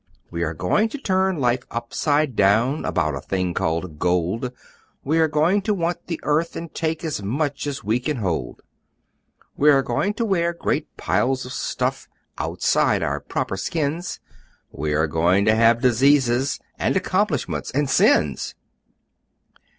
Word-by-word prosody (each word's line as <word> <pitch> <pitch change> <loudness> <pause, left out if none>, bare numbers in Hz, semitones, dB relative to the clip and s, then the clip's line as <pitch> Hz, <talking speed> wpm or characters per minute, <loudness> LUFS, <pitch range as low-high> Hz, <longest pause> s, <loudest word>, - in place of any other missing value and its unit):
We 85 -1 -4
are 80 -1 -1
going 210 - +1
to 290 - -6
turn 190 - +1
life 125 -2 +1
upside 145 +4 0
down 110 +9 +2
About 75 -1 0
a 70 - -4
thing 90 +1 -2
called 80 -1 -2
gold! 90 +8 0 0.5
We 155 +4 +1
are 160 - +4
going 155 +7 +2
to 210 +1 0
want 170 -1 -2
the 165 - -3
earth, 155 +3 0
and 165 -1 -7
take 160 0 -2
As 150 -9 -3
much 140 +8 -2
as 140 -1 -4
we 110 +4 +1
can 145 +3 -2
hold! 85 - -3 0.9
We 150 - +4
are 135 -2 +5
going 190 - -1
to 230 - -1
wear 170 -4 +1
great - - -2
piles 130 +1 0
of 125 - -7
stuff - - -2 0.3
Outside - - +1
our - - -1
proper - - -3
skins! 160 - -2 0.5
We 75 +1 -2
are 80 +1 +2
going 85 +6 +2
to 110 - +5
have 115 +1 +4
Diseases! 130 +1 +3 0.2
And - - +1
Accomplishments!! - - -1
And 145 +2 0
Sins!!!" 75 - +2
130 Hz, 155 wpm, -22 LUFS, 95-160 Hz, 0.9 s, are